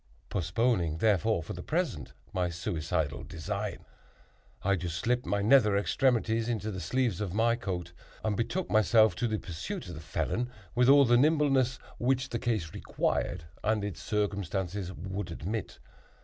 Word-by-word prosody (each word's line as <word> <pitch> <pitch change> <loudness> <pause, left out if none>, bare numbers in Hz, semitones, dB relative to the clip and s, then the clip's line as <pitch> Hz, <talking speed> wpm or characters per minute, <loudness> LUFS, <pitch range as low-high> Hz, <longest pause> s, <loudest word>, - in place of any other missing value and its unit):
Postponing, 90 -2 +1
therefore, 105 -1 +2
for - - -6
the - - -6
present, - - -2 0.2
my 90 -1 0
suicidal 80 -3 -2
design, 80 -3 -4 0.8
I 100 +1 +3
just 85 -2 -3
slipped 120 +6 0
my 100 0 +1
nether 105 -3 +5
extremities 115 +1 +1
into 110 -2 -2
the 95 - -5
sleeves 115 +2 0
of 100 -2 -3
my 115 +1 +3
coat, 90 -7 -4 0.3
and 110 -1 +1
betook 170 - -2
myself 110 -1 +5
to 120 -2 0
a 110 - +1
pursuit 100 - -6
of - - -6
the 75 - -8
felon 120 +9 -2 0.2
with 125 +1 +4
all 140 0 +8
the 120 0 +5
nimbleness 135 -3 +3 0.2
which 130 +1 +1
the 115 - -2
case 110 -10 -1
required 85 -1 -1 0.2
and 110 -1 +1
its 100 -5 -5
circumstances 100 -2 -2
would 95 0 -5
admit. 95 +6 -4
105 Hz, 155 wpm, -30 LUFS, 90-120 Hz, 0.8 s, all